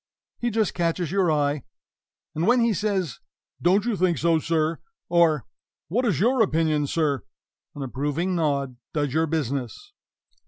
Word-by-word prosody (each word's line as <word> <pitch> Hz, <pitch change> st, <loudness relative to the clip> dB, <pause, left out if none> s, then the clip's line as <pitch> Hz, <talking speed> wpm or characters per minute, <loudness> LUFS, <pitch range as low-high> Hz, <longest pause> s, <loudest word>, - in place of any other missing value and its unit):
He 240 Hz, -, 0 dB
just 220 Hz, -3 st, 0 dB
catches 170 Hz, -1 st, -1 dB
your 190 Hz, -4 st, +2 dB
eye, 145 Hz, -1 st, +1 dB, 0.7 s
and 165 Hz, +4 st, -1 dB
when 245 Hz, +2 st, +5 dB
he 230 Hz, -1 st, +3 dB
says, 195 Hz, -, -1 dB, 0.4 s
"Don't 190 Hz, +5 st, +3 dB
you 240 Hz, -3 st, 0 dB
think 180 Hz, -3 st, +1 dB
so, 165 Hz, +3 st, +2 dB
sir?" 160 Hz, 0 st, 0 dB, 0.3 s
or 165 Hz, -6 st, +3 dB, 0.4 s
"What 240 Hz, +9 st, +1 dB
is 200 Hz, -, +1 dB
your 245 Hz, +5 st, +3 dB
opinion, 155 Hz, -6 st, +2 dB
sir?" 145 Hz, -5 st, 0 dB, 0.5 s
an 145 Hz, -, -5 dB
approving 145 Hz, +8 st, -2 dB
nod 140 Hz, -6 st, 0 dB, 0.2 s
does 145 Hz, -3 st, -1 dB
your 160 Hz, +1 st, +2 dB
business. 145 Hz, -, -3 dB
165 Hz, 150 wpm, -25 LUFS, 145-190 Hz, 0.7 s, when